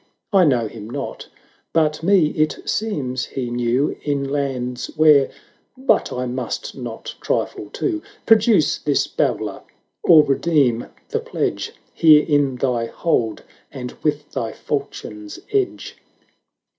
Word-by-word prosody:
I 190 -3 +6
know 125 -6 +2
him 105 0 -9
not 135 +2 -5 0.2
— - - -38
but 155 -1 +2
me 175 -3 +4
it 155 0 0
seems 140 - -1
he 125 -3 -4
knew 120 +4 +1
In 140 -2 -1
lands 130 -3 -2
where 150 -3 +6 0.3
— - - -44
but 265 +1 +2
I 125 0 -2
must 125 -1 -4
not 120 -4 -7
trifle - - -2
too: 325 -4 -2 0.2
Produce 215 - +4
this 145 -2 +1
babbler - - -1 0.2
— - - -53
or 160 -3 +8
redeem 135 -5 +2 0.2
the - - -1
pledge, - - -3 0.2
Here 155 -2 +6
in 145 -4 +2
thy 125 -2 0
hold, 115 -8 -1 0.3
and 125 -3 -6
with 150 -1 -1
thy 115 -1 -3
falchion's 105 -7 -5 0.2
edge." 400 -2 -1
140 Hz, 135 wpm, -21 LUFS, 125-155 Hz, 0.3 s, or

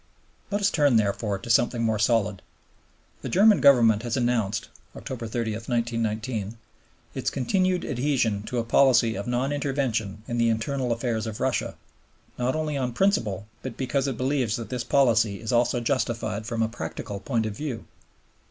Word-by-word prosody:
Let 205 0 -1
us 200 - +3
turn, 145 -5 +3
therefore, 105 -1 +1
to 105 - -10
something 120 0 +2
more 110 -2 +1
solid. 105 -3 +1 0.8
The - - -5
German 205 +3 +5
Government 115 -6 +6
has 120 +2 -2
announced 115 -3 0 0.3
(October 125 -5 -6
30, 115 0 -2
1919) 115 -1 -2 0.6
its - - -1
continued 185 +7 0
adhesion 125 -6 0
to 125 - -3
a 120 - +1
policy 120 -1 +4
of 100 +2 -5
non 125 +3 0
intervention 130 -8 -2
in 120 0 -2
the 115 0 +3
internal 125 +3 -1
affairs 115 -1 -1
of 110 -1 -6
Russia, - - -1 0.6
"not 125 +3 0
only 155 -2 -2
on 125 -3 -2
principle, 115 - +1 0.2
but 130 -3 -7
because 135 +1 -1
it 130 -4 -3
believes 130 -4 0
that 115 -3 -6
this 125 -2 -3
policy 115 -5 +2
is 110 - -4
also 120 0 +2
justified 115 -4 -2
from 115 -2 -1
a - - +1
practical 105 -3 -6
point 115 +1 -1
of 105 -2 -4
view." 135 -3 -5
120 Hz, 165 wpm, -25 LUFS, 110-135 Hz, 0.8 s, Government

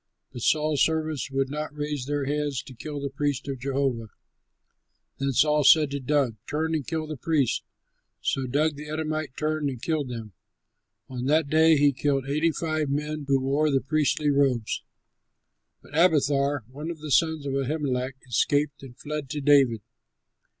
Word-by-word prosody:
But 120 - -7
Saul's 150 +2 +2
servants 155 -4 0
would 135 0 -1
not 150 0 -4
raise 145 -3 -3
their 145 -1 -1
hands 145 -2 -1
to 130 - -11
kill 145 +4 -6
the 140 -1 -4
priests 145 0 -2
of 135 -2 -4
Jehovah. 130 -3 -1 1.1
Then 135 0 0
Saul 150 +3 +3
said 150 0 +6
to 140 - -2
Doeg, 135 -4 0
"Turn 160 +2 -1
and 155 -4 -2
kill 160 -1 -2
the 155 -1 -6
priests." 140 -2 +1 0.6
So 135 -1 -1
Doeg, 145 +3 +1
the 150 +1 -8
Edomite, 155 -2 -3
turned 155 -1 0
and 130 -3 -6
killed 150 0 -1
them. 115 -4 -7 0.7
On 125 -1 -5
that 150 +1 +2
day 160 +1 +6
he 145 0 +5
killed 135 0 0
eighty 155 +4 +2
five 155 -2 -2
men 150 +1 -2
who 135 -1 +3
wore 140 +4 +1
the 135 -2 +3
priestly 150 +1 +1
robes. 135 -5 +1 1.0
But 145 - -12
Abiathar, 145 -5 +3
one 145 +6 -7
of 170 - -5
the 155 -1 -6
sons 160 -1 +2
of 135 - -2
Ahimelech, 135 -2 -1
escaped 145 +4 +1
and 125 -3 -12
fled 150 -2 -5
to 150 +1 -3
David. 135 -6 +4
145 Hz, 170 wpm, -26 LUFS, 135-155 Hz, 1.1 s, said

